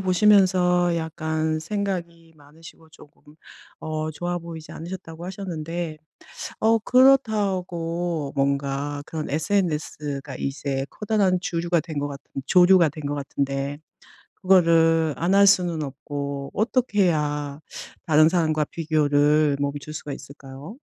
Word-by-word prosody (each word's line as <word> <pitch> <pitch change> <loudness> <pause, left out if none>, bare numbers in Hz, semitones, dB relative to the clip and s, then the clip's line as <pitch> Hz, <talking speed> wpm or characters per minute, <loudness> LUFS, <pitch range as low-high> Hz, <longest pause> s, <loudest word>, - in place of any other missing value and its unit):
보시면서 185 -2 +4
약간 160 -1 -2
생각이 170 -2 -4
많으시고 160 +2 -16
쪼금 150 0 -18 0.5
어 155 0 -3
좋아 175 +3 -3
보이지 165 -2 -9
않으셨다고 170 -1 -8
하셨는데 170 -4 -5 0.6
어 225 +1 +4
그렇다고 185 - +1
뭔가 140 +1 -1
그런 155 -2 -5
SNS가 150 -4 -2
이제 135 0 -3
커다란 205 -4 +1
주류가 170 -1 0
된 160 -2 -8
것 145 0 -2
같은 140 -1 -8
조류가 180 -2 +6
된 155 0 -10
것 145 - -2
같은데 140 0 -3 0.6
그거를 165 -4 +4
안 175 +4 0
할 200 0 +7
수는 175 -5 +3
없고 140 0 -5
어떻게 215 -1 +1
해야 150 -4 -1 0.5
다른 155 0 +6
사람과 155 -3 +1
비교를 150 -2 +2
멈출 145 +1 -4
수가 150 -1 -6
있을까요? 140 - -11
160 Hz, 265 characters per minute, -24 LUFS, 145-180 Hz, 0.6 s, 할